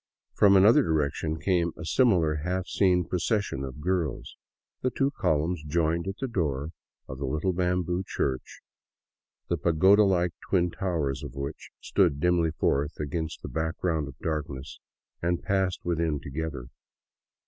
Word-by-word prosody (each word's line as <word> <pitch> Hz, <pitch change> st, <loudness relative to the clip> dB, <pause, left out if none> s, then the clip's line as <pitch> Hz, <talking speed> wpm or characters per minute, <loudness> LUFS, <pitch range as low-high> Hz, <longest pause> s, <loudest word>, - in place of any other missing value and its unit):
From 100 Hz, -1 st, +5 dB
another 105 Hz, +5 st, +7 dB
direction 80 Hz, 0 st, -1 dB
came 85 Hz, 0 st, +1 dB
a 85 Hz, -, -7 dB
similar 85 Hz, -8 st, +3 dB
half 90 Hz, +4 st, -2 dB
seen 90 Hz, -3 st, +2 dB
procession 90 Hz, -, -1 dB
of 70 Hz, +2 st, -7 dB
girls; 85 Hz, -4 st, -2 dB, 0.5 s
the 130 Hz, -, +1 dB
two 135 Hz, +2 st, 0 dB
columns 80 Hz, -, 0 dB
joined 85 Hz, +3 st, 0 dB
at 95 Hz, +1 st, -4 dB
the 135 Hz, -, -3 dB
door 75 Hz, -, -2 dB, 0.4 s
of 65 Hz, -, -7 dB
the 70 Hz, -, -2 dB
little 75 Hz, +7 st, 0 dB
bamboo 90 Hz, 0 st, 0 dB
church, 65 Hz, -7 st, -3 dB, 0.9 s
the 85 Hz, -, 0 dB
pagoda 90 Hz, +7 st, +5 dB
like 90 Hz, -3 st, +2 dB, 0.2 s
twin 90 Hz, -2 st, +2 dB
towers 80 Hz, -9 st, -2 dB
of -, -, -8 dB
which 70 Hz, +2 st, -6 dB
stood 85 Hz, -8 st, +2 dB
dimly 85 Hz, 0 st, +2 dB
forth 75 Hz, -1 st, 0 dB
against 80 Hz, +1 st, -4 dB
the -, -, -4 dB
background 80 Hz, -1 st, -1 dB
of 70 Hz, -1 st, -10 dB
darkness, 75 Hz, -4 st, -4 dB, 0.4 s
and 85 Hz, 0 st, 0 dB
passed 95 Hz, -2 st, 0 dB
within 85 Hz, -3 st, 0 dB
together. 70 Hz, -3 st, -5 dB
85 Hz, 145 wpm, -27 LUFS, 75-90 Hz, 0.9 s, another